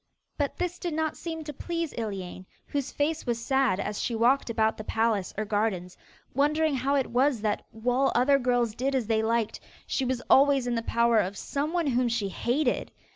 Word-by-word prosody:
But 285 -2 -2
this 360 0 -2
did 345 -3 -3
not 315 -1 -1
seem 325 -2 -5
to 300 -1 -6
please 335 +2 -3
Iliane, 190 -4 -5 0.2
whose 280 -2 -3
face 300 0 -1
was 235 -1 0
sad 265 -5 +1
as 210 +1 -3
she 235 - -1
walked 245 +4 +3
about 220 -1 +1
the 215 - -6
palace 220 -3 0
or 215 - -1
gardens, 205 -4 -1 0.4
wondering 300 +3 +2
how 270 +2 +1
it 270 -4 0
was 255 -1 +2
that, 210 -1 -1
while 245 +4 +1
other 275 +3 +4
girls 245 -3 +1
did 265 +4 -1
as 255 -4 +1
they 220 0 +1
liked, 225 0 0 0.3
she 270 - -1
was 255 -1 -1
always 275 -1 +5
in 245 - -1
the 230 - 0
power 235 0 +3
of 195 0 -1
someone 310 - -1
whom 250 -2 +2
she 230 -4 -1
hated. 245 +7 0
245 Hz, 195 wpm, -27 LUFS, 220-285 Hz, 0.4 s, always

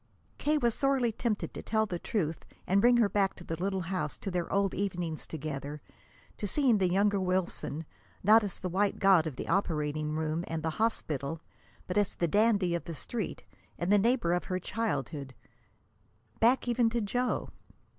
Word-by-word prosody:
K. 300 +1 +2
was 235 -5 +2
sorely 270 -3 +2
tempted 220 -1 -2
to - - -6
tell 220 0 +1
her - - 0
the 180 -4 -4
truth 165 -7 -2 0.2
and 195 +2 +3
bring 240 +2 +6
her 230 -3 +5
back 200 -1 +1
to 175 - -11
the 165 - -4
little 190 0 0
house: 180 -4 -3
to 195 - -5
their 175 -1 -2
old 195 -1 +2
evenings 175 -5 -3
together, 150 -1 -5 0.6
to 205 - -2
seeing 250 -2 +3
the 185 -2 +2
younger 200 +2 +2
Wilson, 185 -4 -1 0.4
not 215 +3 +7
as 200 -3 -3
the 185 - -4
white 195 +3 +1
god 190 -5 +5
of 150 - -5
the - - -6
operating 155 -5 0
room 155 +1 -1
and 160 -1 -3
the 160 - 0
hospital, 160 - -1 0.5
but 185 +3 0
as 205 - 0
the 170 - 0
dandy 200 -1 +3
of 170 - -2
the 165 - -6
Street 220 +5 -4 0.3
and 175 +3 -1
the 205 - +6
neighbor 230 -5 +2
of 180 - -1
her 185 - -1
childhood 145 - -3 1.0
back 245 +3 +3
even 240 -1 +3
to 235 +1 -1
Joe. 245 +4 -1
190 Hz, 185 wpm, -30 LUFS, 165-220 Hz, 1.0 s, not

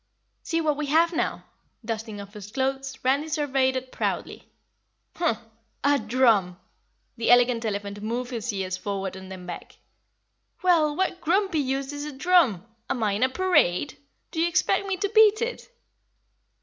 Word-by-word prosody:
"See 330 0 -1
what 300 -2 +1
we 300 -1 -2
have 330 +4 +3
now!" - - -1 0.4
Dusting 220 -2 -4
off 200 0 -10
his 210 -1 -10
clothes, 270 +1 -2
Randy 275 +4 +2
surveyed 270 -3 +1
it 260 0 -4
proudly. - - -3 0.7
"Humph! 325 -10 +1 0.5
A 285 0 +4
DRUM!" 215 -6 +2 0.6
The 230 - -1
Elegant 245 -1 +5
Elephant 205 -1 -4
moved 240 +4 -3
his 235 -1 -3
ears 190 -2 -3
forward 195 -2 -4
and 190 0 -10
then 185 -1 -8
back. 175 - -8 0.9
"Well, 320 -5 +3
what 365 0 -1
grumpy 370 0 +1
use 270 0 -2
is 290 0 -5
a 300 - -5
drum? 275 - +3 0.2
Am 240 - -1
I 210 - +2
in 200 +3 -2
a 260 - +4
parade? 290 - +2 0.4
Do 325 - -4
you 335 - +3
expect 345 +3 +1
me 380 -1 -1
to 400 0 -1
beat 435 -1 +6
it?" 480 +1 -4
260 Hz, 160 wpm, -25 LUFS, 215-315 Hz, 0.9 s, beat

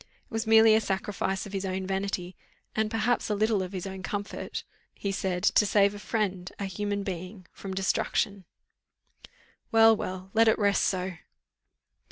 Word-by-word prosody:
It - - -26
was 225 0 -2
merely 220 0 +7
a 220 - +4
sacrifice 195 0 -2
of 200 - -10
his 195 -1 -2
own 190 0 -2
vanity, 190 -1 -3 0.4
and 220 0 +1
perhaps 225 +2 0
a 210 - +1
little 215 -1 +2
of 185 0 -4
his 185 -2 -5
own 190 -1 -6
comfort, 205 +1 -4 0.3
he 200 - -3
said, 185 -2 -2
to 215 - +5
save 200 0 +3
a 205 - -8
friend, 195 -5 -2
a 200 - -3
human 205 +1 -2
being, 185 0 -6
from 190 -1 -7
destruction. 195 0 0 1.3
"Well, 225 -1 +7
well, 185 -1 -6
let 225 +1 +5
it 220 - +4
rest 200 -2 +2
so." 185 -2 -1
200 Hz, 170 wpm, -28 LUFS, 190-215 Hz, 1.3 s, merely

